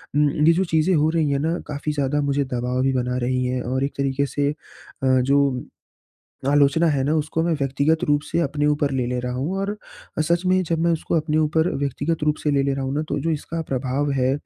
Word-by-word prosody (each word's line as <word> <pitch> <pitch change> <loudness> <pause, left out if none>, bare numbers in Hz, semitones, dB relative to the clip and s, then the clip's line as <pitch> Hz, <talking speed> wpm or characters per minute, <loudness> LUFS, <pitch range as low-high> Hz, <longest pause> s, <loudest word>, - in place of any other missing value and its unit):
उम, 150 0 +4 0.2
ये 165 - +7
जो 185 - +1
चीज़े 165 +3 +2
हो 155 0 +3
रही 160 -2 +1
हैं 140 - +1
ना 165 +4 0
काफ़ी 150 +1 -3
ज़्यादा 145 0 0
मुझे 140 0 +1
दबाव 125 0 -2
भी 135 0 +2
बना 125 0 -1
रही 130 0 0
हैं। 125 0 -1
और 130 +2 -1
एक 140 - -2
तरीके 140 0 0
से 140 0 -1
अ, - - -8 0.7
जो 140 -1 +1 0.8
आलोचना 145 +3 +4
है 135 -2 +1
ना 150 +3 +1
उसको 155 +1 -1
मैं 170 - +1
व्यक्तिगत 140 +3 +1
रूप 145 -2 +2
से - - 0
अपने 145 -1 0
ऊपर 150 -1 +1
ले 130 -2 0
ले 125 0 -2
रहा 125 0 -3
हूँ। 140 +10 -2
और 200 +2 -2 0.5
सच 170 +2 +1
में 185 0 +3
जब 165 -1 -1
मैं 170 - +3
उसको 165 - -2
अपने 155 -1 0
ऊपर 160 +2 +2
व्यक्तिगत 145 +3 -2
रूप 150 0 +2
से 150 - +1
ले 140 -1 +2
ले 135 0 0
रहा 135 -1 -3
हूँ 135 - -2
ना 150 - 0
तो 145 - -1
जो 165 - -1
इसका 160 +2 -3
प्रभाव 135 +2 -1
है 130 -1 +1
145 Hz, 235 wpm, -22 LUFS, 135-155 Hz, 0.8 s, ये